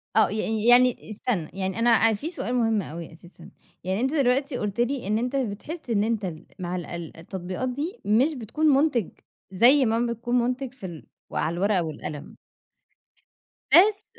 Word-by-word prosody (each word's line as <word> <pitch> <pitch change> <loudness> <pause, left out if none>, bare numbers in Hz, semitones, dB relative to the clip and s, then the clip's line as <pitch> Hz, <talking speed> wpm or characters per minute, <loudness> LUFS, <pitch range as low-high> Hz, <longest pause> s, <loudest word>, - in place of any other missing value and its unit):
آه 220 - +5
ي 215 0 -2
يعني 245 -2 +5
استنى، 205 -6 -2
يعني 190 +1 -3
أنا 230 -1 +4
في 285 +11 -4
سؤال 250 -7 -3
مهم 225 -3 +2
أوي 165 -1 -8
أساسًا، 170 0 -15 0.3
يعني 190 +5 -1
أنت 265 +4 0
دلوقتي 275 -1 +1
قُلت 210 0 -4
لي 245 -2 0
إن 215 +1 +1
أنت 250 +4 -2
بتحس 265 +5 -4
إن 210 -2 +2
أنت 220 -2 -1
ال 170 -2 -7
مع 180 0 -3
ال 175 - -5 0.3
التطبيقات 185 +7 -5
دي 305 - -4
مش 245 +10 +3
بتكون 255 +4 -3
مُنتِج، 275 - +3 0.4
زي 245 +8 +5
ما 225 +1 +1
بتكون 240 +2 -3
مُنتِج 250 +1 -1
في 245 -8 -10
ال 170 -4 -9 0.2
على 165 - -1
الورقة 190 0 +1
والقلم 155 -1 -7 1.4
بس 400 +3 +6
225 Hz, 165 wpm, -25 LUFS, 190-255 Hz, 1.4 s, بس